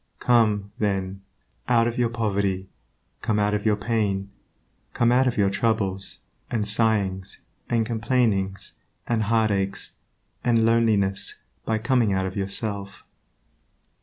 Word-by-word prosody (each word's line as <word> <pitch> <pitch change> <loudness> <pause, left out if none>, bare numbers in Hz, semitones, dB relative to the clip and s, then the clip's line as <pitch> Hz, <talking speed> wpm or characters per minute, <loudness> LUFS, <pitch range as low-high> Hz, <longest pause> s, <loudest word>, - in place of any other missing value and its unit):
Come, 105 -4 +2
then, 95 -2 -1 0.5
out 115 -1 +4
of 120 +2 -3
your 120 -1 +2
poverty; 100 -4 -1 0.5
come 105 - 0
out 105 0 +2
of 105 +1 0
your 105 - +4
pain; 100 -2 -1 0.6
come 120 0 +3
out 130 +1 +4
of 125 - -1
your 100 -2 +3
troubles, 100 -3 0 0.3
and 105 -3 0
sighings, 100 -3 0 0.3
and 115 -2 +2
complainings, 110 -4 0 0.3
and 115 -2 0
heartaches, 105 -3 0 0.5
and 115 -2 +3
loneliness 110 -4 +2 0.3
by 110 - +1
coming 120 -2 +2
out 95 0 0
of 95 - -5
yourself. 100 0 -3
105 Hz, 125 wpm, -24 LUFS, 100-115 Hz, 0.6 s, out